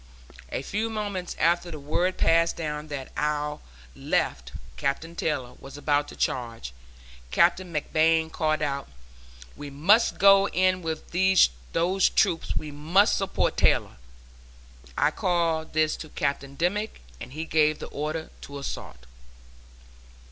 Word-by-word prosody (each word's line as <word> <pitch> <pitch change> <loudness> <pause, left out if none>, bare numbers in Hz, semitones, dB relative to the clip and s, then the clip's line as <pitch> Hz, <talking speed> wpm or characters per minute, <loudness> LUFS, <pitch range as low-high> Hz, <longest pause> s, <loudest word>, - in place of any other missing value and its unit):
A - - -3
few 215 +8 -2
moments 205 -5 -4
after 170 +2 +2
the 155 -3 -7
word 175 +6 -1
passed 165 0 +3
down 150 -2 -4
that 140 -3 -6
our 150 0 -1 0.4
left 60 0 -1 0.2
(Captain 160 +5 -2
Taylor) 135 -7 -2
was 135 +1 -11
about 145 0 +1
to - - -10
charge. 115 - -3 0.6
Captain 180 - +2
McBlain 160 +1 +2
called 155 -1 0
out, 140 -1 -2 0.7
'we 145 - -8
must 185 +12 +3
go 195 0 +6
in 185 -1 +1
with 160 -2 -5 0.6
those 180 +3 +2
troops; 165 - +1
we 150 - -4
must 165 +8 +3
support 195 - 0
Taylor.' - - +2 1.0
I - - +3
called 165 -3 0
this 155 0 +2
to 155 - -9
Captain 140 -1 -3
Dimmick, 195 - -1 0.2
and 125 - -9
he 160 +2 -4
gave 155 -1 +2
the - - -7
order 155 +2 -4
to 140 - -8
assault." 65 - -7
155 Hz, 135 wpm, -26 LUFS, 145-175 Hz, 1.0 s, go